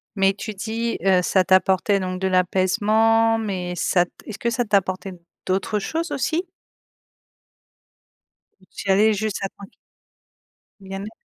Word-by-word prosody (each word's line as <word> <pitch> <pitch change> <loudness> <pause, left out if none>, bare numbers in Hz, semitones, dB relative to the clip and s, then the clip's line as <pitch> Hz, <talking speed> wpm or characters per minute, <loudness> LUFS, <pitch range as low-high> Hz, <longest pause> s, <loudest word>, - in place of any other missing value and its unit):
Mais 195 -1 +3
tu 210 +2 -6
dis, 230 +3 -3
heu, 185 -2 +4
ça 185 +1 +3
t'apportait 190 +1 +3
donc 185 -1 -4
de 190 - +1
l'apaisement, 215 +5 +2
mais 185 -5 -3
ça 175 +1 +2
t - - -27 0.2
est-ce 215 - -6
que 235 - -1
ça 240 +1 0
t'apportait 195 -2 0 0.3
d'autres 195 +3 -1
choses 330 +10 -3
aussi? 320 +6 -1 2.2
Ou - - -21
tu 200 - -7
y - - +6
allais 215 +3 +4
juste, 215 0 -2
ça 195 - -2
tranq 200 0 -14 1.1
Bien 195 0 -7
être. 215 +2 -8
195 Hz, 150 wpm, -22 LUFS, 190-220 Hz, 2.2 s, y